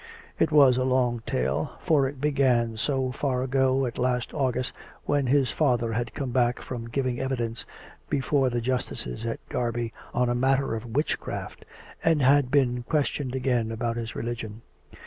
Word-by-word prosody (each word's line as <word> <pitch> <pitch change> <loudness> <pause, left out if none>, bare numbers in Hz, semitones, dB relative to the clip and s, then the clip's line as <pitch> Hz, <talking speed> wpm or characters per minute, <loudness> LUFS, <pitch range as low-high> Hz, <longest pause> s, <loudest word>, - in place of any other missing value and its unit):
It 160 - +3
was 140 -5 +6
a 130 - +1
long 125 -2 +1
tale, 65 +4 -1
for 150 -6 +3
it 135 0 -7
began 130 -5 +2
as 110 +6 -2 0.2
far 130 -3 -1
ago 135 0 +2
as 120 - -5
last 125 0 0
August, 130 -2 -1 0.3
when 145 -2 +1
his 135 -2 +3
father 120 -6 +1
had 115 0 -3
come 135 -3 -3
back 120 -1 +2
from 115 -2 -6
giving 125 0 -1
evidence 120 -4 -2 0.4
be 145 - +1
fore 135 0 +2
the 120 -1 -1
justices 115 - -3
at 115 - -5
Derby 120 -1 -2 0.2
on 125 +1 +1
a 120 - +1
matter 135 +1 +2
of 115 +1 -5
witchcraft, 150 +3 -2 0.4
and 165 -2 +3
had 135 0 +5
been 125 -3 +2
questioned 140 -1 -1
again 125 -4 0
about 115 +1 -2
his 115 -1 -5
religion. 115 -1 -5
125 Hz, 165 wpm, -26 LUFS, 120-135 Hz, 0.4 s, was